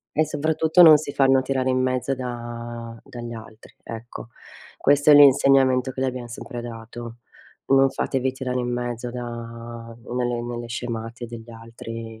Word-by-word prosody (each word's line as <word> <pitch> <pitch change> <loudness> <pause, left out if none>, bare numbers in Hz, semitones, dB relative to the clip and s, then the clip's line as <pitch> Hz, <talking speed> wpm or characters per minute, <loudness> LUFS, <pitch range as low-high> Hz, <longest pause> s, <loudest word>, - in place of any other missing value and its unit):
E 155 0 +3
soprattutto 155 +3 +3
non 155 -3 +9
si 155 - -5
fanno 135 -1 +4
tirare 130 0 -1
in 130 - +1
mezzo 130 +1 0
da 120 -2 -7
dagli 120 -1 -8
altri, 110 -1 -12
ecco. 115 0 -8 0.5
Questo 145 +1 +4
è 150 - +9
l'insegnamento 135 -2 +5
che 130 +1 -4
li 130 - +1
abbiam 125 -1 -4
sempre 120 +1 -7
dato. 115 0 -8 0.5
Non 135 0 +5
fatevi 130 0 -1
tirare 130 -1 -3
in 125 -1 -2
mezzo 120 0 -3
da 120 0 -5 0.9
nelle 120 -1 -1
nelle 120 0 -5
scemate 115 0 -5
degli 115 0 -10
altri. 115 0 -9
125 Hz, 150 wpm, -23 LUFS, 115-135 Hz, 0.9 s, non